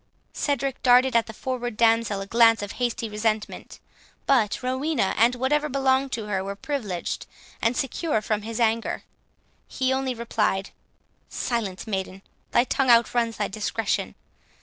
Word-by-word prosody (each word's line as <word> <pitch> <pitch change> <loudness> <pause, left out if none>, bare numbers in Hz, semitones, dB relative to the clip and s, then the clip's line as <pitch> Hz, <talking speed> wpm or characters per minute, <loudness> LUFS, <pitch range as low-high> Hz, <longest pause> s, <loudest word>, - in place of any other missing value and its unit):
Cedric 275 -2 -1
darted 250 0 +5
at 230 -1 +3
the - - -6
forward 245 -1 -4
damsel 225 -3 +3
a - - -5
glance 225 0 +4
of 200 - -5
hasty 240 -2 -2
resentment; 215 0 -3 0.5
but 240 -4 +2
Rowena, 260 -4 0
and 235 +3 +4
whatever 295 +4 +1
belonged 265 0 +1
to 225 -2 -3
her, 195 -2 -2
were 200 +1 -5
privileged 205 - -4 0.3
and 230 +3 +1
secure 270 -1 0
from 215 0 -2
his 225 +2 -5
anger. 230 0 0 0.6
He 260 0 0
only 265 -1 -1
replied, 215 -4 -1 0.6
"Silence, 200 -7 -3
maiden; 190 -2 -4 0.3
thy 240 - +4
tongue 260 0 0
outruns 235 -1 +3
thy 205 -1 0
discretion. 215 +1 -2
230 Hz, 145 wpm, -25 LUFS, 210-260 Hz, 0.6 s, darted